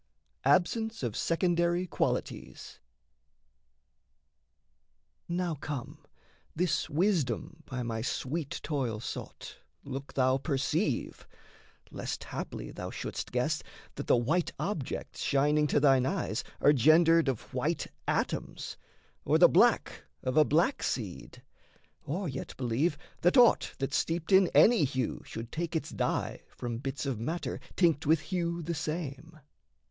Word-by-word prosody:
ABSENCE 220 Hz, -, +2 dB
OF 115 Hz, -4 st, -2 dB
SECONDARY 175 Hz, +1 st, +1 dB
QUALITIES 65 Hz, -, -3 dB, 2.5 s
Now 175 Hz, -1 st, -1 dB
come, 145 Hz, -3 st, -6 dB, 0.6 s
this 175 Hz, -1 st, 0 dB
wisdom 160 Hz, -, 0 dB
by 125 Hz, -2 st, -4 dB
my 115 Hz, -1 st, -3 dB
sweet 140 Hz, +5 st, -3 dB
toil 130 Hz, -8 st, -2 dB
sought -, -, -7 dB, 0.3 s
Look 135 Hz, 0 st, -7 dB
thou 130 Hz, 0 st, +3 dB
perceive, 140 Hz, -, -1 dB, 0.6 s
lest -, -, -4 dB
haply -, -, -6 dB
thou -, -, -6 dB
shouldst -, -, -5 dB
guess -, -, 0 dB, 0.3 s
That -, -, -6 dB
the -, -, +5 dB
white 155 Hz, +9 st, +1 dB
objects 165 Hz, -11 st, -4 dB
shining 150 Hz, +2 st, +2 dB
to 145 Hz, -, +2 dB
thine 135 Hz, -3 st, +4 dB
eyes 150 Hz, -, -1 dB, 0.2 s
Are 145 Hz, -, +6 dB
gendered 160 Hz, +4 st, +5 dB
of 130 Hz, -4 st, -3 dB
white -, -, -1 dB, 0.2 s
atoms, -, -, -2 dB, 0.5 s
or -, -, +3 dB
the -, -, +8 dB
black -, -, +3 dB, 0.2 s
Of 130 Hz, -, -1 dB
a 155 Hz, -, +7 dB
black 170 Hz, -, +2 dB
seed; 105 Hz, -8 st, -4 dB, 0.6 s
or 180 Hz, +6 st, -2 dB
yet 135 Hz, -2 st, -6 dB
believe 135 Hz, +5 st, 0 dB, 0.2 s
that 175 Hz, +7 st, +4 dB
aught 245 Hz, -2 st, +5 dB
That's 135 Hz, +2 st, -1 dB
steeped 165 Hz, +2 st, -2 dB
in 190 Hz, -1 st, +7 dB
any 230 Hz, -7 st, +6 dB
hue 130 Hz, -3 st, -1 dB
should 115 Hz, +1 st, -7 dB
take 170 Hz, 0 st, -3 dB
its 160 Hz, -, -2 dB
dye -, -, -1 dB
From 120 Hz, -2 st, -5 dB
bits 135 Hz, +2 st, -4 dB
of 135 Hz, -5 st, -2 dB
matter 160 Hz, +10 st, -3 dB, 0.2 s
tinct 165 Hz, -5 st, +2 dB
with 160 Hz, +2 st, +4 dB
hue 170 Hz, -2 st, -2 dB
the 170 Hz, +2 st, -2 dB
same. 155 Hz, 0 st, -5 dB
150 Hz, 130 wpm, -30 LUFS, 130-170 Hz, 2.5 s, the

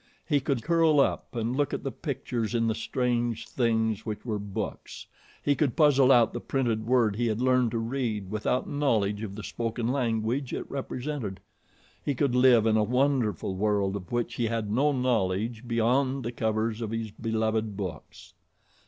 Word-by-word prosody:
He 145 Hz, -3 st, +3 dB
could 135 Hz, -4 st, -1 dB
curl 165 Hz, -3 st, +4 dB
up 135 Hz, -, 0 dB
and 115 Hz, +2 st, -1 dB
look 145 Hz, 0 st, 0 dB
at -, -, -6 dB
the 135 Hz, -, -2 dB
pictures 125 Hz, -4 st, -3 dB
in 115 Hz, -1 st, +2 dB
the 115 Hz, -, +1 dB
strange 120 Hz, 0 st, -1 dB
things 110 Hz, -3 st, 0 dB
which 110 Hz, 0 st, -5 dB
were 110 Hz, -3 st, -2 dB
books, 100 Hz, -1 st, -6 dB, 0.4 s
he 145 Hz, -, +3 dB
could 140 Hz, -3 st, 0 dB
puzzle 140 Hz, -4 st, +5 dB
out 120 Hz, -3 st, +5 dB
the -, -, -3 dB
printed 115 Hz, -5 st, -1 dB
word 120 Hz, -5 st, +3 dB
he 120 Hz, 0 st, +1 dB
had 110 Hz, 0 st, -1 dB
learned 125 Hz, -1 st, +3 dB
to 115 Hz, -, -2 dB
read 115 Hz, -4 st, -2 dB
without 110 Hz, +4 st, -1 dB
knowledge 110 Hz, -8 st, 0 dB
of 100 Hz, -3 st, -5 dB
the 105 Hz, -, -7 dB
spoken 115 Hz, +1 st, -3 dB
language 120 Hz, 0 st, -1 dB
it -, -, -3 dB
represented, 130 Hz, -6 st, -4 dB, 0.6 s
he 145 Hz, -, -1 dB
could 135 Hz, -1 st, +1 dB
live 125 Hz, -3 st, +5 dB
in 110 Hz, -1 st, +3 dB
a 110 Hz, -, +3 dB
wonderful 125 Hz, -4 st, +1 dB
world 100 Hz, -1 st, +1 dB
of 90 Hz, -4 st, -7 dB
which 120 Hz, -1 st, -1 dB
he 120 Hz, -, +1 dB
had 110 Hz, -2 st, -2 dB
no 140 Hz, +7 st, +3 dB
knowledge 115 Hz, -2 st, 0 dB
beyond 130 Hz, +3 st, +1 dB
the 120 Hz, -, -2 dB
covers 110 Hz, -1 st, -1 dB
of 110 Hz, -, -3 dB
his 115 Hz, -1 st, -3 dB
beloved 110 Hz, -1 st, -1 dB
books. 95 Hz, -6 st, -7 dB
115 Hz, 180 wpm, -27 LUFS, 110-130 Hz, 0.6 s, puzzle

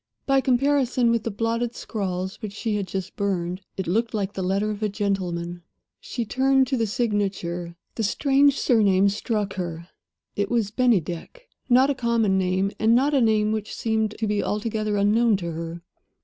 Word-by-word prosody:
By 270 Hz, -1 st, +3 dB
comparison 255 Hz, -2 st, +2 dB
with 230 Hz, -1 st, 0 dB
the -, -, 0 dB
blotted 230 Hz, +3 st, -2 dB
scrawls 190 Hz, -3 st, -4 dB
which 210 Hz, -2 st, -5 dB
she 215 Hz, 0 st, -2 dB
had 200 Hz, -2 st, -2 dB
just 190 Hz, 0 st, -5 dB
burned, 185 Hz, -2 st, -2 dB, 0.2 s
it 190 Hz, -, -2 dB
looked 225 Hz, +6 st, 0 dB
like 200 Hz, -1 st, -2 dB
the 190 Hz, -, -4 dB
letter 195 Hz, +3 st, 0 dB
of 210 Hz, 0 st, -6 dB
a 215 Hz, -, +1 dB
gentleman. 180 Hz, -4 st, -2 dB, 0.4 s
She 235 Hz, -, -4 dB
turned 265 Hz, +3 st, +3 dB
to 270 Hz, -, +1 dB
the 230 Hz, -3 st, 0 dB
signature. 195 Hz, -7 st, -2 dB, 0.2 s
The -, -, -4 dB
strange 275 Hz, +6 st, +3 dB
surname 200 Hz, -5 st, +3 dB
struck 210 Hz, -1 st, -2 dB
her; 170 Hz, -1 st, -5 dB, 0.5 s
it 205 Hz, 0 st, -1 dB
was 230 Hz, -4 st, 0 dB
"Bennydeck." 235 Hz, -, 0 dB, 0.2 s
Not 260 Hz, +3 st, +5 dB
a -, -, +1 dB
common 235 Hz, -6 st, +1 dB
name, 190 Hz, +1 st, 0 dB
and 225 Hz, +1 st, +4 dB
not 275 Hz, +4 st, +3 dB
a 275 Hz, -, +4 dB
name 215 Hz, -2 st, +3 dB
which 215 Hz, -1 st, -3 dB
seemed 220 Hz, -1 st, -1 dB
to 225 Hz, -, -1 dB
be 210 Hz, -1 st, 0 dB
altogether 215 Hz, 0 st, -1 dB
unknown 215 Hz, +2 st, +3 dB
to 170 Hz, -3 st, -4 dB
her. 165 Hz, +1 st, -6 dB
210 Hz, 175 wpm, -24 LUFS, 190-235 Hz, 0.5 s, Not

